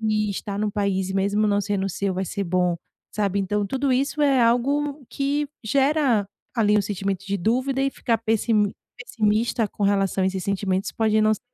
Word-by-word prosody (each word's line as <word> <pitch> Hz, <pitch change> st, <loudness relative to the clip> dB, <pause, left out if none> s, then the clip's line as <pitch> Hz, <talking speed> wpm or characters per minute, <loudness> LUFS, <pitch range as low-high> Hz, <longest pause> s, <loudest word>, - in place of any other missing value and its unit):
e 215 Hz, -1 st, 0 dB
estar 200 Hz, 0 st, -4 dB
num 210 Hz, 0 st, 0 dB
país 195 Hz, -2 st, -1 dB
e -, -, -4 dB
mesmo 200 Hz, +2 st, +1 dB
não 205 Hz, 0 st, +2 dB
sendo 200 Hz, -1 st, -1 dB
o -, -, -1 dB
seu 190 Hz, +1 st, -2 dB
vai 190 Hz, +1 st, -1 dB
ser 200 Hz, +3 st, -3 dB
bom, 180 Hz, 0 st, +1 dB, 0.4 s
sabe. 200 Hz, -2 st, 0 dB
Então, 205 Hz, +1 st, 0 dB
tudo 270 Hz, +3 st, 0 dB
isso 280 Hz, +3 st, 0 dB
é 275 Hz, -3 st, +4 dB
algo 280 Hz, +5 st, +1 dB
que 285 Hz, +1 st, -1 dB, 0.2 s
gera 270 Hz, -3 st, +2 dB, 0.3 s
ali 210 Hz, -2 st, +3 dB
um -, -, +1 dB
sentimento 195 Hz, -1 st, -3 dB
de 200 Hz, 0 st, -1 dB
dúvida 255 Hz, +8 st, 0 dB
e 275 Hz, -, +1 dB
ficar 230 Hz, -4 st, -1 dB
pessi 225 Hz, +1 st, 0 dB, 0.5 s
pessimista 225 Hz, -1 st, 0 dB
com 205 Hz, -, -7 dB
relação 195 Hz, -1 st, +1 dB
a -, -, +3 dB
esses 190 Hz, -1 st, -2 dB
sentimentos 195 Hz, -1 st, -1 dB
pode 220 Hz, -1 st, +2 dB
não 215 Hz, -, +4 dB
ser. 215 Hz, -, -12 dB
210 Hz, 200 wpm, -23 LUFS, 195-245 Hz, 0.5 s, é